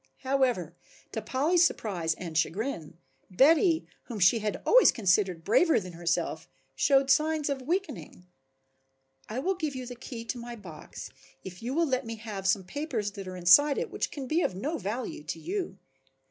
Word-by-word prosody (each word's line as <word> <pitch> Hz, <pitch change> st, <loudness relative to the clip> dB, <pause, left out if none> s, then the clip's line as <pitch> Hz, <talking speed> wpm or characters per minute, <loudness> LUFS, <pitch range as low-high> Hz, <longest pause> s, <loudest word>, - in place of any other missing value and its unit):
However, 260 Hz, -, 0 dB, 0.4 s
to 220 Hz, -, -4 dB
Polly's 300 Hz, -, +2 dB
surprise 175 Hz, -, 0 dB
and 170 Hz, -3 st, -7 dB
chagrin, 170 Hz, -, -2 dB, 0.3 s
Betty, 320 Hz, -, +4 dB, 0.2 s
whom 235 Hz, -, -6 dB
she 185 Hz, +5 st, +5 dB
had 210 Hz, -1 st, -3 dB
always -, -, +7 dB
considered 185 Hz, -5 st, +1 dB
braver 260 Hz, -, +4 dB
than 180 Hz, -3 st, -9 dB
herself, 170 Hz, 0 st, -2 dB, 0.3 s
showed 275 Hz, -1 st, +3 dB
signs 305 Hz, 0 st, +2 dB
of 270 Hz, -1 st, -3 dB
weakening. 335 Hz, -, -4 dB, 1.0 s
"I 220 Hz, -, -5 dB
will 360 Hz, +9 st, 0 dB
give 310 Hz, -6 st, -4 dB
you 255 Hz, -1 st, -5 dB
the 245 Hz, -, -7 dB
key 235 Hz, -1 st, -8 dB
to 245 Hz, -, -4 dB
my 240 Hz, 0 st, -7 dB
box 180 Hz, -8 st, -10 dB, 0.3 s
if 180 Hz, -1 st, -9 dB
you 250 Hz, +4 st, -3 dB
will 335 Hz, +1 st, +3 dB
let 260 Hz, -3 st, 0 dB
me 230 Hz, -, -4 dB
have 210 Hz, -3 st, -5 dB
some 195 Hz, 0 st, +2 dB
papers 225 Hz, -, -3 dB
that 195 Hz, -2 st, -8 dB
are 185 Hz, 0 st, -6 dB
inside 275 Hz, +12 st, +6 dB
it -, -, -3 dB
which -, -, -2 dB
can 280 Hz, -3 st, -6 dB
be 315 Hz, +6 st, +1 dB
of 185 Hz, -, -1 dB
no 290 Hz, -, -3 dB
value 220 Hz, -2 st, -4 dB
to 165 Hz, +1 st, -5 dB
you." 360 Hz, -, -4 dB
235 Hz, 175 wpm, -28 LUFS, 185-285 Hz, 1.0 s, always